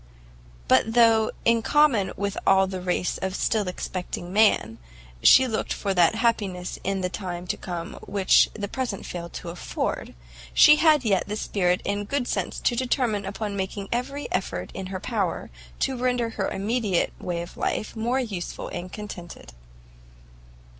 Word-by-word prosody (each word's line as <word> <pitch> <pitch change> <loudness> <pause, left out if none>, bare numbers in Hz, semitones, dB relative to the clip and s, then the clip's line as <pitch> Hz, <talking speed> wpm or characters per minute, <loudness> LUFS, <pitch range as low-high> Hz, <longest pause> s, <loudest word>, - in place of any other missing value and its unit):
But 225 +1 +3
though, 225 -2 +5 0.2
in 230 0 +4
common 240 -8 +3
with 200 0 -2
all 190 0 +6
the 190 -1 -5
race 180 0 -1
of 190 0 -3
still 210 -2 0
expecting 180 0 -5
man, 200 - +3 0.4
she 260 - +8
looked 220 -3 -2
for 200 -2 -2
that 175 +2 +4
happiness 205 -6 -1
in 195 0 -1
the 180 - 0
time 180 -2 -5
to - - -2
come 175 -2 -6
which 195 -2 +4
the 205 -2 -3
present 240 -3 -4
failed 170 -1 -6
to 170 - -6
afford, 170 - -4 0.4
she 300 0 +8
had 305 -5 +4
yet 195 -4 +2
the 210 - -3
spirit 180 -4 0
and 205 0 -2
good 280 -3 -1
sense - - -2
to 240 - +1
determine 240 -5 0
upon 200 +1 -4
making 195 +1 -4
every 275 +4 -2
effort 90 - -2
in 190 -1 -5
her 185 0 -5
power 200 - -2 0.3
to 265 - +1
render 245 -2 0
her 200 -3 -2
immediate 205 -2 0
way 170 -1 -3
of 170 - -11
life 215 - -2
more 240 +4 0
useful 205 -9 -4
and 180 +1 -6
contented. 190 - -9
200 Hz, 160 wpm, -25 LUFS, 185-230 Hz, 0.4 s, she